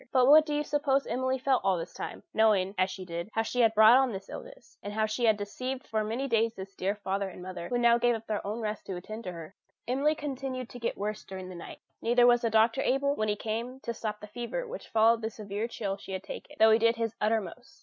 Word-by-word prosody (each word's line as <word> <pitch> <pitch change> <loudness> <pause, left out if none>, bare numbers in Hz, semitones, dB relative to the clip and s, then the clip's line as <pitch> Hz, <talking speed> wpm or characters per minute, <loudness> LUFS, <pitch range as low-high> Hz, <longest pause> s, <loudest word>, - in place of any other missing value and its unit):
But 255 -2 +4
what 305 +3 +7
do 295 - -1
you 295 - 0
suppose 285 -2 +1
Emily 260 +2 -1
felt 265 0 +1
all 190 -2 +2
this 165 - -6
time, - - -7
knowing, 205 -4 +3
as 185 0 +2
she 185 0 -7
did, 170 +2 -5
how 225 - +1
she 250 +2 -3
had 225 -2 +4
brought 220 +3 +8
on 265 -2 +3
this 195 -2 -7
illness, - - -11
and 205 - -6
how 220 0 +1
she 220 +3 -1
had 220 -2 +4
deceived 255 +6 -5
for 220 -1 -1
many 235 +6 -2
days 230 -2 +1
this 195 +1 -8
dear 195 +2 -1
father 195 -1 -2
and 180 - -10
mother, 185 -2 -6
who 245 - 0
now 235 0 +4
gave 240 0 +3
up 225 0 -7
their 215 -2 -2
own 215 +3 -3
rest 215 -1 -4
to 190 - -4
attend 215 +4 -7
her? 170 -1 -7 0.3
Emily 280 +5 +2
continued 265 -4 -4
to 245 - -10
get 230 - -2
worse 210 +1 -3
during 185 -1 -8
the - - -8
night: 170 -1 -10 0.2
neither 240 +1 +4
was 240 0 +5
the 230 - +1
doctor 225 +4 +3
able, 280 +2 +1
when 215 -6 -1
he 205 - +1
came, 230 +5 -4
to 235 - -4
stop 210 -2 -5
the - - -7
fever 240 - -5
which - - -8
followed 225 +1 +4
the 220 - -2
severe 210 0 -4
chill 200 -4 -4
she 195 - -9
had 190 0 -4
taken, - - -9
though 220 0 +6
he 220 - +5
did 230 +1 +3
his 230 -1 -2
uttermost. 220 - -2
225 Hz, 260 wpm, -29 LUFS, 205-250 Hz, 0.3 s, brought